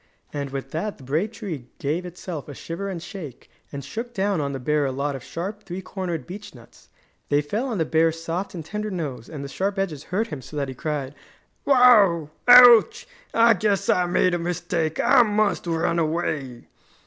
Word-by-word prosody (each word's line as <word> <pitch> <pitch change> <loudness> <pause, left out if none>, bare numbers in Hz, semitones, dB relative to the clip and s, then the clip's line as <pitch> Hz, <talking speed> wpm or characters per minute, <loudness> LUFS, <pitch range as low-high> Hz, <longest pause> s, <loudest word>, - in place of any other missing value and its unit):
And 140 -1 -3
with 135 0 -6
that 195 +6 -3
the 135 - -15
brave 155 +11 -1
tree 180 - -7
gave 165 +6 -2
itself 175 -3 -7
a 145 - -8
shiver 170 +8 -5
and 175 -3 -5
shake, 175 - -9 0.2
and 140 -2 -7
shook 235 +9 -6
down 195 -3 0
on 140 -1 -2
the 135 - -4
bear 150 +3 +1
a 135 - 0
lot 140 +2 -2
of 130 - -8
sharp, 200 +5 -6
three 190 -1 -7
cornered 175 -8 -4
beech 205 -2 -9
nuts. 120 -1 -18 0.4
They 145 - +3
fell 215 - -2
on 235 -5 -2
the 160 - +1
bear's 165 +1 +2
soft 170 +4 -4
and 165 -3 -6
tender 210 +4 -4
nose 150 - -5
and 145 -3 -7
the - - -5
sharp 195 +7 -2
edges 165 -7 -3
hurt 220 +5 -1
him 145 - -6
so 150 +4 -9
that 140 -2 -2
he - - -5
cried: 145 -2 -4 0.5
"Wow! 210 - +5 0.2
Ouch! 245 - +8 0.2
I 230 0 +5
guess 210 -3 0
I 180 -1 +3
made 180 0 +2
a 175 - 0
mistake! 170 -2 -2
I 270 -3 +5
must 210 -4 +1
run 165 0 0
away!" 155 -6 -2
170 Hz, 200 wpm, -24 LUFS, 145-205 Hz, 0.5 s, Ouch